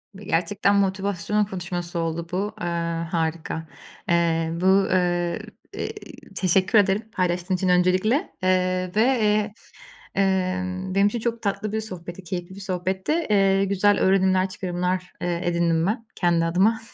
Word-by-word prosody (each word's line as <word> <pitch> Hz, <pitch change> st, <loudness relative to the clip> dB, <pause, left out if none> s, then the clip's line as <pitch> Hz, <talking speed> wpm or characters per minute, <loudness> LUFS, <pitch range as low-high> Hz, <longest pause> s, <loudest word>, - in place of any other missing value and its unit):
Ve 200 Hz, -, -11 dB
gerçekten 200 Hz, +3 st, +1 dB
motivasyon 200 Hz, +1 st, 0 dB
konuşması 175 Hz, -3 st, -4 dB
oldu 165 Hz, 0 st, -2 dB
bu, 200 Hz, +4 st, -2 dB
eee, 175 Hz, -, -2 dB, 0.4 s
harika. 160 Hz, -1 st, -2 dB, 0.4 s
Eee, 165 Hz, -1 st, +2 dB
bu, -, -, 0 dB
ııı, 180 Hz, -3 st, +2 dB, 0.3 s
iii, -, -, -8 dB
teşekkür 190 Hz, +3 st, +2 dB
ederim 200 Hz, +2 st, +2 dB
paylaştığın 180 Hz, -1 st, 0 dB
için 185 Hz, 0 st, 0 dB
öncelikle. 185 Hz, -, +2 dB
Eee, 185 Hz, 0 st, +1 dB
ve, 215 Hz, -, +4 dB
eee, 215 Hz, -4 st, +2 dB, 0.6 s
ımm, 185 Hz, -1 st, 0 dB
benim 200 Hz, +1 st, +5 dB
için 235 Hz, +3 st, -2 dB
çok 235 Hz, 0 st, -2 dB
tatlı 200 Hz, +1 st, -2 dB
bir 220 Hz, 0 st, -1 dB
sohbetti, 180 Hz, -3 st, -8 dB
keyifli 175 Hz, +1 st, -5 dB
bir 200 Hz, -, -10 dB
sohbetti. 190 Hz, +3 st, -2 dB, 0.2 s
Eee, 195 Hz, -1 st, +3 dB
güzel 200 Hz, +1 st, +2 dB
öğrenimler, 190 Hz, 0 st, +3 dB
çıkarımlar, 180 Hz, -1 st, -3 dB
eee, 175 Hz, -1 st, -1 dB
edindim 170 Hz, -1 st, +1 dB
ben 230 Hz, +2 st, -2 dB
kendi 170 Hz, -2 st, +2 dB
adıma. 195 Hz, +7 st, +2 dB
185 Hz, 140 wpm, -24 LUFS, 175-200 Hz, 0.6 s, benim